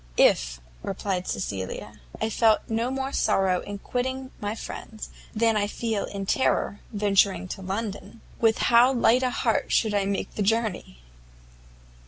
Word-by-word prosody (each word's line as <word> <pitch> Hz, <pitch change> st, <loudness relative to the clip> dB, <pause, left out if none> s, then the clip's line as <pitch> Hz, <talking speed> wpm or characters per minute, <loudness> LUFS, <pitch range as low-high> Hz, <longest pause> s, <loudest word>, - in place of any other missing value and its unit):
"If," -, -, +3 dB, 0.2 s
replied 190 Hz, -1 st, -3 dB
Cecilia, 95 Hz, -1 st, -4 dB, 0.2 s
"I 225 Hz, -, -1 dB
felt 220 Hz, 0 st, +4 dB
no 230 Hz, +2 st, 0 dB
more 265 Hz, +1 st, -2 dB
sorrow 190 Hz, -2 st, +2 dB
in 205 Hz, 0 st, -6 dB
quitting 260 Hz, +4 st, -3 dB
my 205 Hz, +1 st, -2 dB
friends, 220 Hz, -1 st, -8 dB, 0.3 s
than 225 Hz, 0 st, +3 dB
I 205 Hz, -1 st, +1 dB
feel 220 Hz, -1 st, -2 dB, 0.2 s
terror 205 Hz, -2 st, +1 dB
in 210 Hz, -, -6 dB
venturing 195 Hz, -2 st, +3 dB
to 195 Hz, -, -6 dB
London, 205 Hz, +3 st, -5 dB, 0.2 s
with 225 Hz, -1 st, +3 dB, 0.2 s
how 240 Hz, +3 st, +7 dB
light 245 Hz, -1 st, +4 dB
a 255 Hz, -, +1 dB
heart -, -, 0 dB
should 220 Hz, -2 st, +2 dB
I 200 Hz, -1 st, +1 dB
make 200 Hz, 0 st, -2 dB
the -, -, -3 dB
journey!" 205 Hz, -, -1 dB
210 Hz, 150 wpm, -26 LUFS, 195-230 Hz, 0.3 s, how